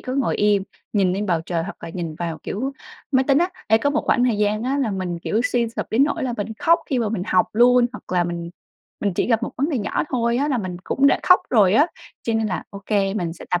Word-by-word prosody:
có 255 - -5
ngồi 270 -4 0
im, 205 -2 +3 0.3
nhìn 190 -4 +2
lên 205 +2 -2
bầu 170 -4 +1
trời 170 -2 -1
hoặc - - -7
là - - -7
nhìn 165 -2 -5
vào, 165 0 -4
kiểu, 265 +7 -3 0.4
máy 260 0 +4
tính 275 - +5
á. 350 +3 +2 0.2
Ê, 220 +1 +4
có 285 - +1
một 295 - 0
khoảng 250 -2 +3
thời 230 -4 +1
gian 210 +1 +1
á, 270 +3 0
là 255 -6 0
mình, 185 -3 -3
kiểu, 210 +6 -1
suy 235 -2 +1
sụp 230 - -5
đến 255 +6 +4
nỗi 290 - -2
là 245 -2 -2
mình 210 +2 -4
khóc 335 +1 +4
khi 260 - +1
mà 225 -3 0
mình 205 -4 -2
học 220 - +3
luôn, 245 +2 +5
hoặc 185 - -10
là 175 - +3
mình 170 0 -4 0.5
mình 200 - 0
chỉ - - 0
gặp 230 -1 +2
một - - -2
vấn 280 +5 0
đề 265 - 0
nhỏ 205 - -1
thôi 235 -2 0
á, 285 +3 0
là 260 -4 +1
mình 185 -3 -4
cũng 275 +1 +2
đã - - +3
khóc 365 - +6
rồi 210 -5 +4
á. 295 +6 +5 0.4
Cho 230 - -1
nên 225 -1 +1
là 185 - -3
OK, 200 +1 -12 0.3
mình 170 -3 -2
sẽ 175 - -11
tập 180 - +1
220 Hz, 280 wpm, -22 LUFS, 185-255 Hz, 0.5 s, khóc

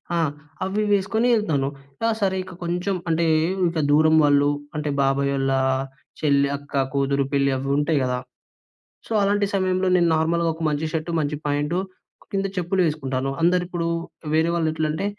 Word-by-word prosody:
ఆ!అవి 155 +5 -2
వేసుకొని 215 +4 +1
ఎళ్తాను. 155 -11 0 0.3
కా 225 - +2
సరే 190 -1 +1
ఇక 185 0 -11
కొంచెం 180 +3 -1
అంటే 165 +1 +2 0.4
ఇక 165 -1 -2
దూరం 155 +2 +5
వాళ్ళు 145 0 +4 0.3
అంటే 150 0 -2
బాబాయ్ 140 0 +1
వాళ్ళ 135 0 0 0.7
చెల్లి, 140 -2 +2
అక్క, 145 0 -17 0.2
కూతురు 140 0 +1
పెళ్ళి 140 0 +3
అవి 135 +1 -4
ఉంటాయి 150 +1 +1
కదా! 125 -1 0 0.9
సో, - - -6
అలాంటి 200 +1 +2
సమయంలో 185 -1 +1
నేను 170 -1 +3
నార్మల్‌గా 165 +1 +1
ఒక 165 - -8
మంచి 150 +1 -1
షర్ట్ 160 +1 -2
మంచి 150 0 -1
ప్యాంట్ 145 +3 0 0.6
కింద 195 0 0
చెప్పులు 180 +2 0
వేసుకుంటాను 135 -4 -2
అందరు 175 +2 +3
ఇప్పుడు 175 -1 -3 0.5
వేరే 160 +1 +3
వాళ్ళు 165 -2 +1
ఎట్లంటే 155 +2 -2
160 Hz, 155 wpm, -23 LUFS, 145-180 Hz, 0.9 s, దూరం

